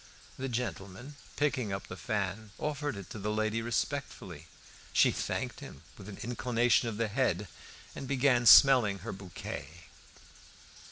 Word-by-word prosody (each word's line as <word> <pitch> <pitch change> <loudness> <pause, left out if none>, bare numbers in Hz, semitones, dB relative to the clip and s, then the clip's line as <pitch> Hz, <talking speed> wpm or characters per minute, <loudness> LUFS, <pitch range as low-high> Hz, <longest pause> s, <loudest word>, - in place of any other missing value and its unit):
The 135 0 -4
gentleman, 120 +2 -5 0.2
picking 130 -7 0
up 95 0 -4
the - - -8
fan, 105 0 -3
offered 145 -4 -3
it 100 - -9
to 110 - -6
the 105 +2 -3
lady 110 +1 0
respectfully; 115 - -4 0.4
she - - +4
thanked - - -3
him 70 - -11
with 100 0 -11
an 100 - -9
inclination 120 0 +1
of 105 - -6
the 115 0 0
head, 105 -4 0 0.5
and 135 - -6
began 130 -3 +2
smelling 125 -8 +8
her - - -3
bouquet. 95 -6 -7
115 Hz, 145 wpm, -31 LUFS, 100-130 Hz, 0.5 s, smelling